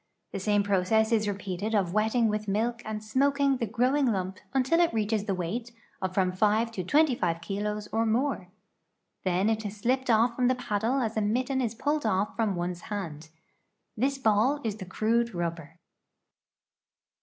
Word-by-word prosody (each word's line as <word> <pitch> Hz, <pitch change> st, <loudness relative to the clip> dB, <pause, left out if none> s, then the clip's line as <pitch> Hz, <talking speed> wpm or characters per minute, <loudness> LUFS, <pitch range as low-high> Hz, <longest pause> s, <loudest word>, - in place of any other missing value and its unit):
The -, -, -4 dB
same 205 Hz, +1 st, +2 dB
process 205 Hz, +3 st, +2 dB
is 215 Hz, -2 st, +2 dB
repeated 200 Hz, +1 st, -3 dB
of 185 Hz, -4 st, +1 dB
wetting 220 Hz, +2 st, +2 dB
with 210 Hz, 0 st, -2 dB
milk 230 Hz, +4 st, 0 dB
and 215 Hz, -1 st, -5 dB
smoking 275 Hz, +4 st, +2 dB
the 235 Hz, -2 st, -2 dB
grow 250 Hz, +5 st, +1 dB
ing 285 Hz, -2 st, +2 dB
lump 190 Hz, -4 st, -2 dB
until 270 Hz, +6 st, +2 dB
it 345 Hz, -1 st, +4 dB
reaches 215 Hz, -1 st, 0 dB
the 195 Hz, -3 st, -1 dB
weight 220 Hz, +7 st, -4 dB, 0.3 s
of 190 Hz, -1 st, -1 dB
from 185 Hz, -1 st, +1 dB
5 215 Hz, +4 st, +2 dB
to 190 Hz, -5 st, -4 dB
25 235 Hz, -, +2 dB
kilos 205 Hz, +4 st, -3 dB
or 225 Hz, 0 st, +1 dB
more. 235 Hz, -4 st, 0 dB, 0.8 s
Then 185 Hz, +2 st, +1 dB
it 220 Hz, 0 st, 0 dB
is 205 Hz, 0 st, -6 dB
slipped 255 Hz, +5 st, 0 dB
off 235 Hz, +1 st, +4 dB
from 250 Hz, 0 st, +2 dB
the 255 Hz, -, +3 dB
paddle 250 Hz, +1 st, -1 dB
as 225 Hz, -2 st, -2 dB
a -, -, +2 dB
mitten 255 Hz, +6 st, 0 dB
is 235 Hz, -2 st, -2 dB
pulled 295 Hz, +5 st, -1 dB
off 195 Hz, +2 st, 0 dB
from 220 Hz, -4 st, 0 dB
one's 175 Hz, 0 st, -3 dB
hand. 165 Hz, -7 st, -5 dB, 0.7 s
This 270 Hz, +5 st, 0 dB
ball 240 Hz, +4 st, +2 dB
is 215 Hz, -2 st, -2 dB
the 190 Hz, -, -7 dB
crude 230 Hz, +3 st, 0 dB
rubber." 165 Hz, -2 st, -4 dB
215 Hz, 180 wpm, -28 LUFS, 195-245 Hz, 0.8 s, it